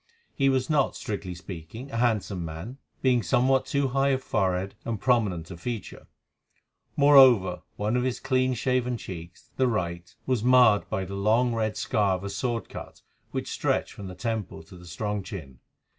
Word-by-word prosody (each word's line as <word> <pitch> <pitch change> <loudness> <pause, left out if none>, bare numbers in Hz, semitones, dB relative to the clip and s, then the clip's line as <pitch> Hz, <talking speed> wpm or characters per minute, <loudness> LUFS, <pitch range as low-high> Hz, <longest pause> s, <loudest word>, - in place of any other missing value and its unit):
He 135 -1 +2
was 130 -1 +1
not, 145 -4 +2
strictly 100 -4 -5
speaking, 90 - -9
a 115 - -3
handsome 105 -6 0
man, 85 - -7 0.2
being 125 -2 +4
somewhat 130 +8 +2
too 140 -1 +1
high 135 +2 +2
of 130 -1 0
forehead 95 -3 0
and 115 -3 -3
prominent 100 -9 +1
of 85 -1 -9
feature; 115 -2 -6 0.9
moreover, 130 -10 +6
one 105 +3 -1
of 125 - +2
his 125 -1 -1
clean 130 0 +1
shaven 125 0 0
cheeks, 85 -5 -10
the 130 - +3
right, 85 -6 -2
was 125 -4 0
marred 125 -4 +5
by 95 - -2
the 95 - -8
long, 110 +5 +2
red 110 -2 -1
scar 100 -3 +1
of 90 - -7
a 100 - -4
sword 120 +1 -2
cut - - -10 0.3
which - - -4
stretched - - -1
from 100 - -8
the 90 - -8
temple 110 -5 -4
to 85 - -15
the 90 0 -13
strong 105 +5 -3
chin. 80 - -9
110 Hz, 175 wpm, -27 LUFS, 95-125 Hz, 0.9 s, moreover